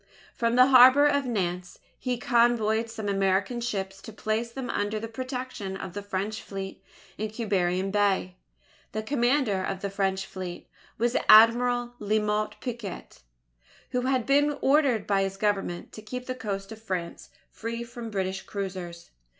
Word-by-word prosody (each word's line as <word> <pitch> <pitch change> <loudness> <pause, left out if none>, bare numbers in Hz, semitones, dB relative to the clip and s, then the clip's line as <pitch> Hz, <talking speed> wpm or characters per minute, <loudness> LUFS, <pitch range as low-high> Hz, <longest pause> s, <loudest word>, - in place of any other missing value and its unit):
From 230 0 0
the 250 0 +8
harbour 260 +2 +8
of 285 -2 +2
Nantes, 180 -5 -2 0.2
he 250 -1 -2
convoyed 235 -3 +2
some 220 -2 -5
American 195 +4 +1
ships 195 -4 -3
to - - -9
place 220 +2 -2
them 260 +1 -5
under 205 +1 -1
the 225 - -5
protection 250 -5 -5
of 190 -2 -7
the 205 - -4
French 205 +2 -3
fleet 195 -1 -7 0.4
in 215 0 -2
Quiberon 195 -4 0
Bay. 195 -3 +1 0.6
The 215 +1 -2
commander 240 -5 +1
of 190 0 -3
the 200 - -3
French 195 -1 -1
fleet 185 -2 -7 0.3
was 240 +2 0
Admiral 240 +2 +6
La 210 +1 +1
Motte 210 0 -1
Picquet, 235 -7 -6 0.7
who 250 -1 0
had 255 -2 0
been 290 +2 +3
ordered 270 -7 +3
by 195 -1 +2
his 195 0 -2
Government 195 -4 -1
to 215 - -10
keep 250 +4 -6
the 255 - -3
coast 200 -5 -5
of 220 0 -9
France 185 -5 -5 0.2
free 230 +1 -5
from 235 -1 -8
British 190 -2 -2
cruisers. 185 -4 -6
215 Hz, 160 wpm, -27 LUFS, 195-240 Hz, 0.7 s, the